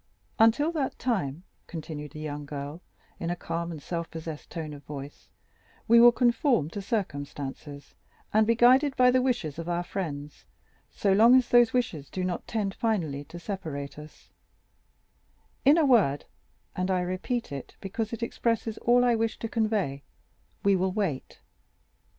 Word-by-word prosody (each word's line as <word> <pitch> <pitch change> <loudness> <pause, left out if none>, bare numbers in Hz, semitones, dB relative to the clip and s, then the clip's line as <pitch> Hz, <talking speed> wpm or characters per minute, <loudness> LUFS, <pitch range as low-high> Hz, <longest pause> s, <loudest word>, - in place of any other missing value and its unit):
"Until 230 +8 +4
that 300 -5 -2
time," 180 - -2 0.2
continued 155 -3 -7
the 155 - -8
young 150 -1 -5
girl 145 +3 -6 0.4
in 170 - -3
a 175 - -1
calm 170 0 -4
and 160 - -6
self 170 +3 -4
possessed 160 -2 -7
tone 155 -3 -5
of 145 0 -11
voice, 145 -1 -9 0.6
"we 235 +1 +7
will 240 0 +9
conform 240 - +2
to 205 - -5
circumstances, 145 - -5 0.4
and 215 0 +4
be 230 - +4
guided 260 +4 +5
by 250 0 +5
the 255 0 +3
wishes 235 - -1
of 165 +1 -5
our 175 0 0
friends, 150 -6 -6 0.4
so 200 -2 +1
long 230 +5 +7
as 255 -1 +3
those 240 -1 +6
wishes 175 - -2
do 185 - -3
not 180 -2 -3
tend 205 -4 -2
finally 170 -13 -1
to 175 - -10
separate 160 -7 -5
us; 150 +1 -14 1.3
in 290 +4 +7
a 325 - +4
word, 205 - +3 0.5
and 185 +1 -1
I 185 -1 +2
repeat 185 - -3
it, 140 -2 -7
because 215 +3 -4
it 230 0 -4
expresses 230 -1 -1
all 245 +1 +4
I 240 - +4
wish 225 0 0
to 225 - -4
convey,—we 200 - -2
will 185 0 +1
wait." 185 -9 -3
185 Hz, 160 wpm, -27 LUFS, 150-230 Hz, 1.3 s, will